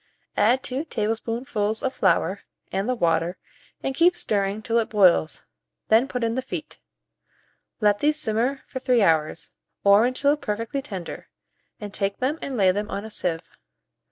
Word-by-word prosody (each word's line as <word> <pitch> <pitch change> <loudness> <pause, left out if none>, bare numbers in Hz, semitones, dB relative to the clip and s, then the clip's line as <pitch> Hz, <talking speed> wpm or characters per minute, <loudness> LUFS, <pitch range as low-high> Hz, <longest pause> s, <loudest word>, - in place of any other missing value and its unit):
Add 240 +6 +3
2 275 +3 -3
tablespoonfuls 220 -2 -2
of 265 - -1
flour 190 -1 +1 0.3
and 195 +5 -1
the 255 - +1
water, 170 -3 +1 0.5
and 270 - -1
keep 345 +5 +4
stirring 200 0 -1
till 235 -1 +1
it 225 0 -2
boils; 185 -7 +3 0.4
then 230 +4 +5
put 250 -3 -3
in 230 0 +1
the 260 - -1
feet. 175 -10 -7 1.0
Let 205 -1 +3
these 300 +1 +1
simmer 240 +5 -1
for 260 - -6
3 250 -4 +3
hours, 160 -4 +1 0.3
or 200 +4 +6
until 280 +3 +2
perfectly 230 +3 -3
tender, 195 -10 -7 0.5
and 205 -1 -7
take 200 -1 -2
them 280 +5 -1
and 265 -3 -4
lay 190 -3 +5
them 205 +3 -3
on 200 - -4
a 220 - -9
sieve. 170 -5 -2
220 Hz, 160 wpm, -24 LUFS, 200-255 Hz, 1.0 s, or